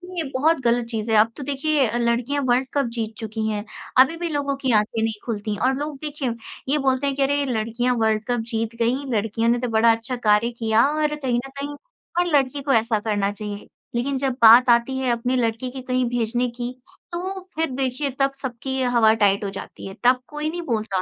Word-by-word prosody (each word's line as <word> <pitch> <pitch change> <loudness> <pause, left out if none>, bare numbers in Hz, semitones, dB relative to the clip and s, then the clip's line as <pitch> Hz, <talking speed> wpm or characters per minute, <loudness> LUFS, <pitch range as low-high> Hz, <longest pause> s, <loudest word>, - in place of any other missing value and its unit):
ये 330 - -1
बहुत 310 +4 +2
गलत 235 0 +2
चीज़ 225 -1 -4
है। 220 - +5
अब 225 +2 +4
तो 285 - -6
देखिए 285 -2 +1
लड़कियाँ 235 +4 0
वर्ल्ड 250 +2 +2
कप 280 -2 +1
जीत 225 -2 -3
चुकी 220 -1 -3
हैं। 210 -1 -2 0.4
अभी 280 +6 +5
भी 345 0 -3
लोगों 285 -2 -1
की 265 -2 -1
आँखें 220 +1 -2
नहीं 225 0 0
खुलती 210 -2 -3
और 260 +1 +3
लोग 295 -1 -4
देखिए 295 -4 -3 0.4
ये 300 - +3
बोलते 265 +2 +2
हैं 275 - -1
कि 280 - -2
अरे 285 +1 +1
लड़कियाँ 240 +1 0
वर्ल्ड 220 -1 +1
कप 245 -1 0
जीत 225 0 -2
गईं, 255 +5 0
लड़कियों 225 +2 0
ने 240 0 +2
तो 250 - -2
बड़ा 225 +1 +4
अच्छा 230 +3 -2
कार्य 220 0 +2
किया 225 0 +3
और 300 0 0
कहीं 260 -5 -1
न - - -9
कहीं 290 +1 -4 0.4
हर 355 - +3
लड़की 275 +1 -1
को 275 0 +1
ऐसा 225 -1 +2
करना 205 -2 0
चाहिए। 205 -1 -7 0.3
लेकिन 265 +3 0
जब 265 -1 0
बात 235 +3 +8
आती 235 +3 +3
है 260 -1 -1
अपनी 245 +2 0
लड़की 230 +1 -1
की 260 0 -7
कहीं 255 0 0
भेजने 245 +1 0
की, 240 +1 -5 0.4
तो 375 +3 -4 0.2
फिर 320 -1 0
देखिए 265 +2 -1
तब 275 0 +3
सबकी 265 +1 -3
हवा-टाइट 220 -4 +3
हो 200 - -2
जाती 195 - -9
है। 195 - -7
तब 250 +1 +5
कोई 300 +1 -3
नहीं 345 +2 -4
बोलता। 215 - -1
245 Hz, 215 wpm, -23 LUFS, 225-275 Hz, 0.4 s, बात